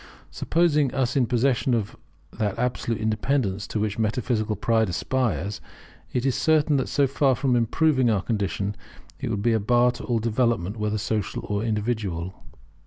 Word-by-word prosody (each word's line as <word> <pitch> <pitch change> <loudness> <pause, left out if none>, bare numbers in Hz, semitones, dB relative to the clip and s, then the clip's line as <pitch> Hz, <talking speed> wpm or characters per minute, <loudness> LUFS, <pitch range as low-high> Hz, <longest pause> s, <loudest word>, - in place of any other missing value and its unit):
Supposing 150 -5 +2
us 130 -1 0
in 130 -4 +3
possession 125 +1 +2
of 110 -1 -3 0.4
that 105 -3 -2
absolute 120 -2 -1
independence 110 -2 0
to 110 - -3
which 105 0 -2
metaphysical 110 -1 0
pride 110 +1 +1
aspires, 100 +1 -1 0.5
it 125 +1 -1
is 135 - +2
certain 155 -1 +3
that 130 - -1
so 140 - +3
far 135 0 +2
from 130 0 +1
improving 130 +2 +2
our 100 -4 +1
condition, 100 -2 -2 0.4
it 135 - -3
would 105 -3 -2
be 120 0 +3
a 110 - +2
bar 120 +3 +3
to 120 - -9
all 120 - 0
development, 115 -4 0
whether 105 0 -1
social 105 0 -2
or 105 -1 -1
individual. 105 -6 -2
115 Hz, 165 wpm, -25 LUFS, 105-130 Hz, 0.5 s, in